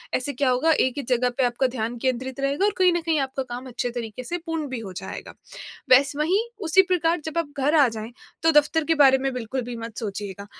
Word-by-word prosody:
ऐसे 270 Hz, +3 st, -1 dB
क्या 265 Hz, 0 st, +1 dB
होगा 255 Hz, +6 st, +2 dB
एक 260 Hz, -5 st, +2 dB
ही 285 Hz, -, -2 dB
जगह 250 Hz, 0 st, +2 dB
पे 265 Hz, -, +2 dB
आपका 245 Hz, +2 st, +1 dB
ध्यान 240 Hz, -1 st, -4 dB
केंद्रित 260 Hz, +2 st, -2 dB
रहेगा 280 Hz, +7 st, +1 dB
और 415 Hz, -, +3 dB
कहीं 370 Hz, -1 st, +5 dB
न 345 Hz, -, 0 dB
कहीं 325 Hz, -2 st, 0 dB
आपका 270 Hz, 0 st, -2 dB
काम 250 Hz, +1 st, -7 dB
अच्छे 245 Hz, 0 st, -3 dB
तरीके 235 Hz, 0 st, -6 dB
से 345 Hz, +7 st, -3 dB
पूर्ण 325 Hz, -3 st, -3 dB
भी 260 Hz, -2 st, -4 dB
हो 200 Hz, -4 st, -8 dB
जाएगा। -, -, -7 dB, 0.6 s
वैसे 275 Hz, +3 st, +5 dB
वहीं 345 Hz, +7 st, +2 dB, 0.3 s
उसी 380 Hz, +4 st, +6 dB
प्रकार 350 Hz, -2 st, +1 dB
जब 320 Hz, +1 st, -3 dB
आप 330 Hz, -3 st, -2 dB
घर 285 Hz, +4 st, +2 dB
आ 285 Hz, -4 st, +6 dB
जाएँ 225 Hz, +1 st, -7 dB, 0.3 s
तो 325 Hz, 0 st, +4 dB
दफ़्तर 300 Hz, +1 st, +3 dB
के 325 Hz, -, +2 dB
बारे 270 Hz, -3 st, +6 dB
में 270 Hz, 0 st, -2 dB
बिल्कुल 250 Hz, +1 st, -3 dB
भी 240 Hz, 0 st, -6 dB
मत 230 Hz, -1 st, -8 dB
सोचिएगा 200 Hz, -2 st, -5 dB
265 Hz, 240 wpm, -24 LUFS, 245-315 Hz, 0.6 s, उसी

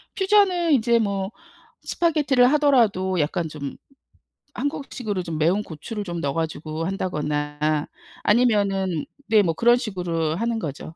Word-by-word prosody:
퓨전은 380 Hz, -5 st, +3 dB
이제 235 Hz, -2 st, +3 dB
뭐 200 Hz, -2 st, -1 dB, 0.5 s
스파게티를 290 Hz, -6 st, +2 dB
하더라도 225 Hz, -, +3 dB
약간 165 Hz, +3 st, 0 dB
좀 145 Hz, -2 st, -6 dB, 0.8 s
한국식으로 245 Hz, -, -3 dB
좀 165 Hz, -3 st, -4 dB
매운 170 Hz, +7 st, +2 dB
고추를 205 Hz, +7 st, -6 dB
좀 175 Hz, -3 st, -5 dB
넣어 140 Hz, -3 st, -1 dB
가지고 160 Hz, 0 st, -3 dB
한다거나 150 Hz, -4 st, -1 dB, 0.4 s
아니면은 200 Hz, -7 st, +2 dB, 0.2 s
네 215 Hz, -1 st, +6 dB
뭐 165 Hz, -2 st, +1 dB
그런 240 Hz, +6 st, +4 dB
식으로 175 Hz, -, -2 dB
하는 230 Hz, +4 st, -1 dB
거죠. 160 Hz, 0 st, -6 dB
195 Hz, 295 characters per minute, -23 LUFS, 160-240 Hz, 0.8 s, 네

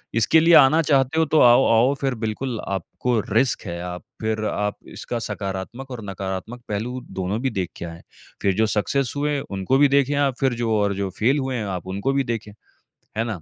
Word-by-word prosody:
इसके 115 Hz, +8 st, +4 dB
लिए 165 Hz, +2 st, +5 dB
आना 155 Hz, +4 st, +7 dB
चाहते 140 Hz, 0 st, +2 dB
हो 160 Hz, -, +4 dB
तो 155 Hz, 0 st, +2 dB
आओ, 120 Hz, +2 st, +7 dB
आओ 120 Hz, +5 st, +4 dB
फिर 135 Hz, -2 st, 0 dB
बिल्कुल 115 Hz, +2 st, -3 dB
आपको 110 Hz, +5 st, -1 dB
रिस्क 120 Hz, +3 st, +2 dB
है। 85 Hz, 0 st, -4 dB
आप 90 Hz, 0 st, -6 dB, 0.2 s
फिर 110 Hz, 0 st, -1 dB
आप 105 Hz, -1 st, -2 dB, 0.2 s
इसका 120 Hz, -, -4 dB
सकारात्मक 105 Hz, +5 st, -5 dB
और 120 Hz, -3 st, -6 dB
नकारात्मक 95 Hz, +5 st, -5 dB
पहलू 120 Hz, +5 st, -3 dB, 0.2 s
दोनों 95 Hz, +4 st, -1 dB
भी 135 Hz, -, +1 dB
देख 95 Hz, -5 st, -2 dB
के -, -, -6 dB
आएँ। 85 Hz, 0 st, -9 dB, 0.4 s
फिर 100 Hz, -, +2 dB
जो 110 Hz, +2 st, +3 dB
सक्सेस 130 Hz, +5 st, 0 dB
हुए 145 Hz, 0 st, 0 dB
उनको 100 Hz, +1 st, -1 dB
भी 145 Hz, -, +7 dB
देखें 140 Hz, +1 st, +2 dB
आप, 140 Hz, -3 st, +1 dB
फिर 135 Hz, -2 st, +2 dB
जो 115 Hz, -1 st, -1 dB
और 100 Hz, -1 st, +1 dB
जो 100 Hz, 0 st, -2 dB
फेल 130 Hz, +7 st, +3 dB
हुए 130 Hz, -1 st, -2 dB
हैं 110 Hz, -3 st, -2 dB
आप 90 Hz, -, -11 dB
उनको 100 Hz, +8 st, 0 dB
भी 140 Hz, 0 st, +1 dB
देखें। 115 Hz, -4 st, -4 dB, 0.7 s
है 110 Hz, -, +2 dB
ना? 105 Hz, -7 st, -4 dB
115 Hz, 210 wpm, -23 LUFS, 100-135 Hz, 0.7 s, आना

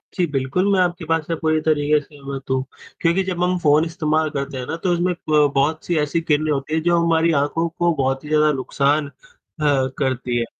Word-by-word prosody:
जी, 180 Hz, -, +2 dB
बिल्कुल 145 Hz, +7 st, 0 dB
मैं 190 Hz, -, +3 dB
आपके 175 Hz, -1 st, 0 dB
बात 165 Hz, -1 st, 0 dB
से 165 Hz, -, -1 dB
पूरी 155 Hz, -1 st, +1 dB
तरीके 150 Hz, -1 st, +2 dB
से 145 Hz, -, -14 dB
सहमत 140 Hz, -2 st, -9 dB
हूँ। 130 Hz, 0 st, +1 dB, 0.4 s
क्योंकि 170 Hz, +3 st, +2 dB
जब 180 Hz, -2 st, -2 dB
हम 180 Hz, 0 st, +1 dB
फ़ोन 150 Hz, -1 st, +3 dB
इस्तेमाल 160 Hz, -2 st, 0 dB
करते 140 Hz, -1 st, -4 dB
हैं 125 Hz, -, -4 dB
ना 160 Hz, -, -3 dB
तो 185 Hz, -, +1 dB
उसमें 175 Hz, +1 st, 0 dB, 0.2 s
प 150 Hz, -1 st, +4 dB
बहुत 150 Hz, +3 st, +1 dB
सी 175 Hz, -, -1 dB
ऐसी 150 Hz, +3 st, 0 dB
किरणें 155 Hz, -1 st, +1 dB
होती 140 Hz, +1 st, -2 dB
हैं 160 Hz, -, +1 dB
जो 175 Hz, 0 st, +3 dB
हमारी 165 Hz, 0 st, +2 dB
आँखों 165 Hz, +4 st, 0 dB
को 175 Hz, +1 st, 0 dB
बहुत 135 Hz, -1 st, -1 dB
ही 150 Hz, -, -9 dB
ज़्यादा 150 Hz, 0 st, +3 dB
नुकसान 140 Hz, +3 st, 0 dB
अ, 140 Hz, -, -13 dB, 0.9 s
करती 130 Hz, -3 st, -1 dB
हैं। 120 Hz, -, 0 dB
155 Hz, 220 wpm, -21 LUFS, 140-170 Hz, 0.9 s, प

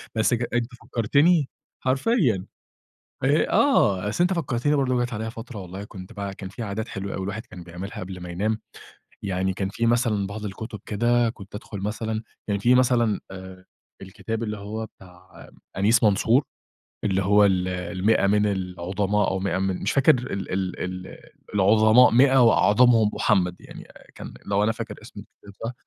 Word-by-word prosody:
بس 110 Hz, +2 st, +2 dB
ج 120 Hz, 0 st, 0 dB
أنتَ 120 Hz, -1 st, 0 dB, 0.2 s
فكرتني 140 Hz, +7 st, +2 dB, 0.3 s
حرفيًا، 130 Hz, -, +1 dB, 0.8 s
إيه؟ 145 Hz, +3 st, +2 dB
آه، 105 Hz, -, +3 dB
أصل 175 Hz, +11 st, +1 dB
أنتَ 180 Hz, -, +2 dB
فكرتني 145 Hz, -3 st, 0 dB
برضو 130 Hz, -3 st, +1 dB
جات 120 Hz, 0 st, -2 dB
عليَّ 110 Hz, +1 st, -4 dB
فترة 115 Hz, -1 st, -9 dB
والله 95 Hz, +2 st, -8 dB
كنت 95 Hz, 0 st, -11 dB
بقى 100 Hz, -1 st, -5 dB
كان 95 Hz, -2 st, -8 dB
في 115 Hz, +4 st, -7 dB
عادات 110 Hz, +2 st, -4 dB
حلوة 100 Hz, 0 st, -5 dB
أوي 95 Hz, -, -4 dB
الواحد 105 Hz, +3 st, -5 dB
كان 90 Hz, -1 st, -11 dB
بيعملها 90 Hz, +4 st, -8 dB
قبل 95 Hz, 0 st, -7 dB
ما 90 Hz, -, -7 dB
ينام، 105 Hz, +5 st, -1 dB, 0.6 s
يعني 95 Hz, -1 st, -1 dB
كان 95 Hz, 0 st, -3 dB
في 115 Hz, +3 st, -2 dB
مثلًا 115 Hz, -4 st, +1 dB
بعض 105 Hz, +1 st, -6 dB
الكتب 105 Hz, +1 st, -7 dB
كده، 120 Hz, +2 st, +1 dB
كنت 105 Hz, -2 st, -11 dB
أدخل 105 Hz, -2 st, -7 dB
مثلًا 110 Hz, +2 st, -3 dB, 0.2 s
كان 100 Hz, -1 st, 0 dB
في 120 Hz, +4 st, +4 dB
مثلًا 120 Hz, -4 st, +2 dB
آآ، 95 Hz, -1 st, -10 dB, 0.4 s
الكتاب 105 Hz, +4 st, -5 dB
اللي 105 Hz, -1 st, -4 dB
هو 110 Hz, +2 st, -5 dB
بتاع 90 Hz, -2 st, -16 dB, 0.3 s
أنيس 110 Hz, +4 st, +3 dB
منصور، 110 Hz, +6 st, +3 dB, 0.6 s
اللي 95 Hz, -1 st, +1 dB
هو 105 Hz, +2 st, +5 dB
ال 95 Hz, -2 st, +2 dB
المِئة 90 Hz, +4 st, 0 dB
من 105 Hz, +1 st, +3 dB
العُظماء 95 Hz, +2 st, -1 dB
أو 95 Hz, -, -1 dB
مِئة 95 Hz, 0 st, -1 dB
من 95 Hz, -1 st, -2 dB
مش 100 Hz, -, 0 dB
فاكر 140 Hz, -, +4 dB
ال 120 Hz, -8 st, -4 dB
ال 95 Hz, -1 st, -3 dB, 0.3 s
ال -, -, -11 dB, 0.4 s
العظماء 110 Hz, +5 st, +5 dB
مِئة 130 Hz, +3 st, +5 dB
وأعظمهم 115 Hz, -1 st, +4 dB
مُحَمد، 90 Hz, -3 st, +1 dB
يعني -, -, -12 dB, 0.3 s
كان -, -, -9 dB
لو 100 Hz, +1 st, +1 dB
أنا 110 Hz, -, +2 dB
فاكر 110 Hz, -2 st, -6 dB
اسم 110 Hz, -3 st, -11 dB
الكتاب 100 Hz, 0 st, -16 dB
صح. 115 Hz, -, -3 dB
105 Hz, 170 wpm, -24 LUFS, 95-115 Hz, 0.8 s, هو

